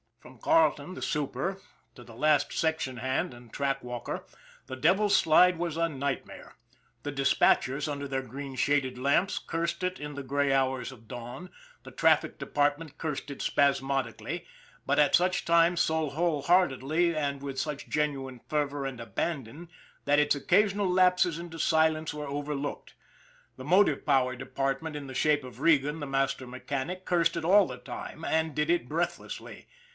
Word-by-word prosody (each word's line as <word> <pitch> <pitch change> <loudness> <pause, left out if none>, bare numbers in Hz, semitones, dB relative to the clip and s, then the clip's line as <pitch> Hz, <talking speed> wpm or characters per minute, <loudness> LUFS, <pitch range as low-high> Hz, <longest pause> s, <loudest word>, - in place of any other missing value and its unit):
From - - -16
Carleton, 185 - +2
the - - -8
super, 150 +6 -2 0.4
to 120 - -12
the 115 -1 -13
last 150 +4 +2
section 160 -6 -1
hand 130 +2 -1
and 120 -1 -15
track 135 -1 -1
walker, 125 -1 -5 0.4
the 130 - -5
Devil's 200 +10 +3
Slide 180 +2 +5
was 170 -2 -3
a 165 0 +1
nightmare. 140 -2 -5 0.5
The 145 - -3
dispatchers, 135 +1 +2
under 140 0 -4
their 135 -1 -2
green 135 +2 -7
shaded 130 -1 +1
lamps, 140 +9 +1
cursed 170 +2 -3
it 185 0 -2
in 150 0 -6
the 140 0 -6
gray 140 +1 0
hours 130 -2 0
of 115 -4 -15
dawn; 125 +9 -8 0.3
the - - -11
traffic - - +2
depart 145 0 +1
ment 155 -3 -11
cursed 150 -2 -4
it 140 - -7
spasmodically, 135 -1 0 0.4
but - - +2
at 145 -2 +5
such 180 +1 +2
times 170 +1 +4
so 160 -1 +1
whole 155 -1 0
heartedly 170 -1 +2
and 140 -2 -2
with 135 -1 -4
such 150 -2 -4
genuine 135 -4 -2
fervor 145 -2 -1
and 135 -3 -5
abandon 135 - -4 0.4
that 145 +1 +4
its 150 0 +3
occasional 195 +6 +2
lapses 180 -2 +3
into 170 -1 -8
silence 160 0 +2
were 150 -1 -6
overlooked; 145 0 -4 0.6
the 130 - -9
motive 175 -3 +3
power 130 -3 +2
department 135 +4 -3
in 145 -2 -6
the 130 - -8
shape 150 +1 +2
of 125 -2 -11
Regan, 150 0 +3
the 145 - -5
master 135 -1 -1
mechanic, 140 +8 -5
cursed 170 -2 +2
it 165 - -3
all 195 +2 +6
the - - -7
time, 160 - -8
and 160 -1 0
did 150 +1 0
it 170 -8 +1
breathlessly. 170 +3 -4
145 Hz, 165 wpm, -29 LUFS, 135-165 Hz, 0.6 s, all